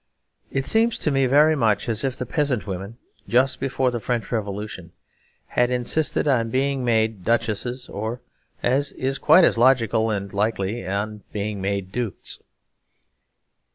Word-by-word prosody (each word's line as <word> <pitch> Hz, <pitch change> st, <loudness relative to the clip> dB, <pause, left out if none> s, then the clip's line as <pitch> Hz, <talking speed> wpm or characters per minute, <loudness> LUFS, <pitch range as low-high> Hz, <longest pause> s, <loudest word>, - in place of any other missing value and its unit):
It 135 Hz, 0 st, -1 dB
seems 225 Hz, +1 st, +2 dB
to 150 Hz, -, 0 dB
me 135 Hz, -1 st, +2 dB
very 150 Hz, +4 st, +5 dB
much 110 Hz, -7 st, +1 dB
as 110 Hz, -2 st, -1 dB
if 135 Hz, -2 st, -1 dB
the 125 Hz, -, -3 dB
peasant 140 Hz, -3 st, 0 dB
women, 100 Hz, +3 st, -6 dB, 0.3 s
just 130 Hz, +2 st, +2 dB
before 130 Hz, -1 st, 0 dB
the 120 Hz, -, -3 dB
French 120 Hz, +1 st, -3 dB
Revolution, 100 Hz, -5 st, -4 dB, 0.5 s
had 125 Hz, 0 st, +1 dB
insisted 125 Hz, +6 st, 0 dB
on 120 Hz, -5 st, +2 dB
being 135 Hz, +2 st, 0 dB
made 110 Hz, -4 st, +1 dB
duchesses 120 Hz, +3 st, -1 dB
or 110 Hz, +4 st, -4 dB, 0.4 s
(as 135 Hz, +3 st, +1 dB
is 135 Hz, +1 st, -2 dB
quite 160 Hz, +6 st, +6 dB
as 115 Hz, -, +4 dB
logical 115 Hz, -3 st, +3 dB
and 100 Hz, -2 st, -3 dB
likely) 105 Hz, 0 st, -1 dB
on 105 Hz, +2 st, -3 dB
being 105 Hz, -1 st, -3 dB
made 95 Hz, -1 st, -2 dB
dukes. 120 Hz, -2 st, -4 dB
120 Hz, 150 wpm, -23 LUFS, 105-130 Hz, 0.5 s, quite